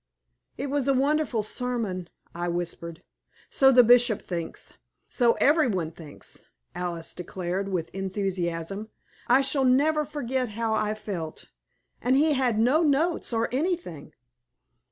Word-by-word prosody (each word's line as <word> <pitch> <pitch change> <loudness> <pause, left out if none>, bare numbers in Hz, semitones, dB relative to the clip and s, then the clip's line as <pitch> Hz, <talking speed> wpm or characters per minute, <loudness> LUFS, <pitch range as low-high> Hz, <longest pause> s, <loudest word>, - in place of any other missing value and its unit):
"It 275 +1 -4
was 285 -2 0
a 275 - +3
wonderful 275 -4 +1
sermon," 215 -6 -3 0.2
I 175 +1 -3
whispered. 170 -1 -4 0.5
"So 270 -1 +5
the 250 -1 +7
Bishop 240 -2 +5
thinks; 170 -3 -6 0.3
so 240 -2 +3
every 300 0 +3
one 180 -8 -2
thinks," 155 -3 -12 0.3
Alice 175 -2 -5
declared, 180 +2 -4
with 170 -4 -3
enthusiasm. 190 0 -3 0.4
"I 250 +3 +5
shall 270 0 +1
never 295 +4 +3
forget 260 -4 -2
how 225 -1 0
I 215 0 0
felt. 190 -7 -6 0.5
And 255 +1 +2
he 305 +2 +3
had 255 -5 +1
no 255 +8 +3
notes, 315 +2 +1
or 225 0 +1
anything." 290 - -3
225 Hz, 135 wpm, -26 LUFS, 180-270 Hz, 0.5 s, the